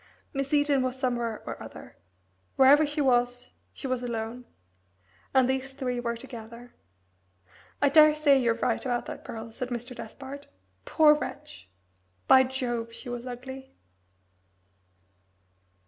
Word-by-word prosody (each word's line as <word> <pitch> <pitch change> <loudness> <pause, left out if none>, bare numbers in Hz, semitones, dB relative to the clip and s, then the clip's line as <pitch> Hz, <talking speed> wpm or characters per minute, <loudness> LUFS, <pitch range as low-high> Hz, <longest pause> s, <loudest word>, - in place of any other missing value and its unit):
Miss 275 -1 -3
Eden 290 -2 +3
was 255 0 -2
somewhere 240 -3 -2
or - - -6
other. - - -11 0.6
Wherever 285 +3 +6
she 295 +1 -1
was 245 -2 +1 0.2
she - - -9
was 255 -2 -1
alone. 235 0 -4 0.9
And 260 -2 +4
these 265 +1 -2
three 255 -3 -3
were 235 -1 -2
together. 235 -1 -11 1.1
"I 285 - +6
daresay 300 -1 +6
you're 235 -2 +2
right 230 - -1
about 245 -2 -1
that - - -8
girl," 225 0 -7
said 250 +2 -5
Mr. 245 +1 -5
Despard. 270 +6 -9 0.4
"Poor 305 -1 +6
wretch! 100 - -7 0.6
By 260 0 +7
Jove, 240 -3 -3
she 250 - -8
was 245 +1 -5
ugly!" 260 +2 -8
255 Hz, 130 wpm, -27 LUFS, 240-270 Hz, 1.1 s, By